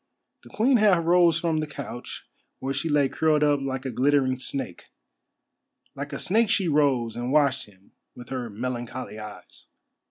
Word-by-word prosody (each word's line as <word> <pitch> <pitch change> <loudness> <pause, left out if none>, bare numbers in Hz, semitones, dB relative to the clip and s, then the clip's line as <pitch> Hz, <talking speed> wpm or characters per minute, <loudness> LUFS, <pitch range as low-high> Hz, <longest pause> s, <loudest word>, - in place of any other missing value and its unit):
The - - -16
Queen 250 +4 +3
half 195 -6 +3
rose 170 -1 +4
from 165 -3 0
the 155 - -2
couch 140 -4 -8 0.3
where 135 +1 -3
she 140 +4 -2
lay 145 -2 +3
curled 155 +2 +1
up 145 -1 +2
like 135 -1 -4
a 130 - -2
glittering 130 +1 +2
snake. 130 -8 -5 1.1
Like - - -6
a - - -4
snake 220 +3 +2
she 200 -5 +2
rose 140 -7 +2
and 120 +2 -3
watched 140 -4 +2
him 95 -1 -23 0.2
with 120 0 -11
her 125 -3 -4
melancholy 120 +1 -5
eyes. 105 -1 -11
140 Hz, 165 wpm, -25 LUFS, 125-160 Hz, 1.1 s, rose